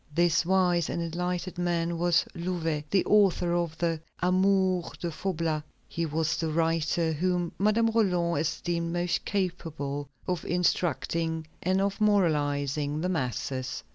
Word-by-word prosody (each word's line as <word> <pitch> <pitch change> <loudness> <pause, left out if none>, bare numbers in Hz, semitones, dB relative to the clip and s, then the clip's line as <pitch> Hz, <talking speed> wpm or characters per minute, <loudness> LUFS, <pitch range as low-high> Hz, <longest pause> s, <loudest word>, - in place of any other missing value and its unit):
This 175 0 +3
wise 180 -3 +2
and - - -2
enlightened 180 +2 -3
man 170 -1 0
was 175 0 +3
Louvet, 170 -4 -2
the 195 - +2
author 190 -4 +3
of 170 -2 -1
the 165 -2 -1 0.2
Amours 185 0 +2
de 170 - -3
Faublas. 165 -3 -1 0.3
He 170 0 -2
was 160 +1 0
the 165 - -1
writer 165 +1 +1
whom 175 +2 0
Madame 220 +3 +3
Roland 180 -8 +2
esteemed 170 +1 -2
most 175 0 -1
capable 155 -7 -3 0.2
of 180 -3 -1
instructing 165 -2 0 0.2
and 185 +2 +1
of 200 +2 -1
moralizing 150 -7 +1
the 180 - 0
masses. 130 -4 -2
170 Hz, 135 wpm, -28 LUFS, 160-180 Hz, 0.3 s, This